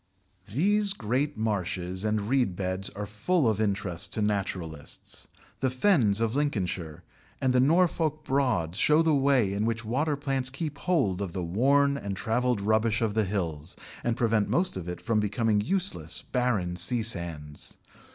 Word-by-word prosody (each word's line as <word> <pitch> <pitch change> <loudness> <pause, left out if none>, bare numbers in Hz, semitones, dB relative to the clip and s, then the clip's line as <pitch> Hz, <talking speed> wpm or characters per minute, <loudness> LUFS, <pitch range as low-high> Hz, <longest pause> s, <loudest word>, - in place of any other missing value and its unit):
These 200 - +2
great 135 - -1
marshes 95 -3 -2
and 105 -1 0
reed 125 -7 +1
beds 95 +1 -2
are 105 +1 -6
full 120 - 0
of 110 -1 +1
interest 95 -4 -1
to 110 - 0
naturalists. 95 -7 -4 0.3
The 130 - +1
Fens 125 - +3
of 115 +1 0
Lincolnshire 95 - -2 0.4
and 130 -1 +1
the 125 - +4
Norfolk 155 +1 +2
Broads 110 -11 0
show 150 +2 +4
the 160 -1 +3
way 135 -8 +3
in 100 +1 -1
which 115 0 -1
water 145 +7 0
plants 135 -2 -2
keep 145 +1 -5
hold 105 - +1
of 95 -4 -4
the 90 - -3
worn 140 +10 +2
and 100 -7 -5
travelled 120 0 0
rubbish 110 +2 +2
of 110 -2 0
the 110 -1 +2
hills, 85 -5 -3 0.3
and 120 -1 0
prevent 115 -3 +1
most 180 +2 +1
of 90 -2 -5
it 90 - -5
from 115 -2 0
becoming 105 0 +1
useless, 105 - -1
barren 110 -9 0
sea 110 +7 +2
sands. 85 -8 -1
110 Hz, 160 wpm, -28 LUFS, 95-135 Hz, 0.4 s, the